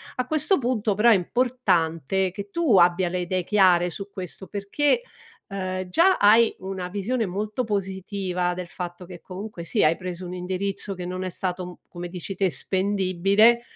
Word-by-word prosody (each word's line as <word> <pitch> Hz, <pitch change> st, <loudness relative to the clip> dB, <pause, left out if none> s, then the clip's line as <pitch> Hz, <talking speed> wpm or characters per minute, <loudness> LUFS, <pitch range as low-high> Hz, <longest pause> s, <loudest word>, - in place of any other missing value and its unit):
A 250 Hz, 0 st, -2 dB
questo 310 Hz, +6 st, +3 dB
punto 235 Hz, -5 st, 0 dB
però 215 Hz, +4 st, +4 dB
è -, -, +7 dB
importante 190 Hz, -, 0 dB
che 200 Hz, +2 st, -7 dB
tu 280 Hz, -, +2 dB
abbia 175 Hz, +1 st, +4 dB
le 180 Hz, +1 st, -2 dB
idee 180 Hz, 0 st, -2 dB
chiare 180 Hz, -4 st, +4 dB
su 195 Hz, +3 st, -7 dB
questo, 190 Hz, 0 st, -5 dB
perché, 280 Hz, -, 0 dB, 0.4 s
uhm, 185 Hz, -1 st, -4 dB
già 345 Hz, -, +4 dB
hai 220 Hz, +3 st, +5 dB
una 190 Hz, -1 st, -5 dB
visione 215 Hz, +5 st, -1 dB
molto 210 Hz, +6 st, -3 dB
positiva 190 Hz, -3 st, -2 dB
del 180 Hz, 0 st, -6 dB
fatto 175 Hz, 0 st, -7 dB
che 175 Hz, -1 st, -11 dB
comunque 190 Hz, -1 st, -8 dB
sì, 170 Hz, -, 0 dB
hai 155 Hz, +2 st, +4 dB
preso 180 Hz, 0 st, -6 dB
un 180 Hz, -, -6 dB
indirizzo 190 Hz, +2 st, -3 dB
che 180 Hz, -1 st, -6 dB
non 185 Hz, +1 st, -4 dB
è 185 Hz, -, -3 dB
stato, 180 Hz, 0 st, -4 dB
come 175 Hz, 0 st, -7 dB
dici 185 Hz, +2 st, -6 dB
te, 190 Hz, 0 st, +1 dB
spendibile, 195 Hz, -, +2 dB
190 Hz, 170 wpm, -24 LUFS, 180-210 Hz, 0.4 s, è